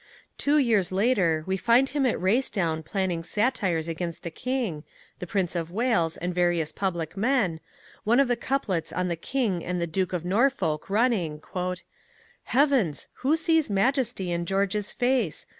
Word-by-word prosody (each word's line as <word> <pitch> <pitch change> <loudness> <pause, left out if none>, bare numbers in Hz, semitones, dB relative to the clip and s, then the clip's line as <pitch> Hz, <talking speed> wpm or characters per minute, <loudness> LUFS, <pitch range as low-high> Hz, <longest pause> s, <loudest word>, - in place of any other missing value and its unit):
Two 290 +1 +3
years 220 -10 +2
later 185 -6 +2
we, 190 0 -1
find 245 +6 +3
him 275 -1 +1
at 245 - 0
Racedown 185 -5 +1
planning 185 -1 -1
satires 190 -3 0
against 170 0 -4
the 170 - -5
King, 230 - -3 0.4
the 180 - -6
Prince 185 -1 -1
of 165 -1 -2
Wales, 200 -5 +1
and 180 +1 -3
various 175 -3 +1
public 170 -5 -3
men, 205 -6 +1 0.4
one 235 +4 +3
of 275 - +4
the 245 - +2
couplets 235 -9 -2
on 180 0 -1
the 170 - -1
King 195 -2 -1
and 180 0 -2
the 170 - 0
Duke 185 +3 -1
of 175 -2 -3
Norfolk 190 - +1
running: 200 -8 +1 1.1
Heavens! 255 - +2
who 290 +5 +3
sees 325 -3 +2
majesty 215 -2 0
in 170 0 -2
George's 200 +2 0
face? 245 - 0
195 Hz, 160 wpm, -26 LUFS, 170-245 Hz, 1.1 s, of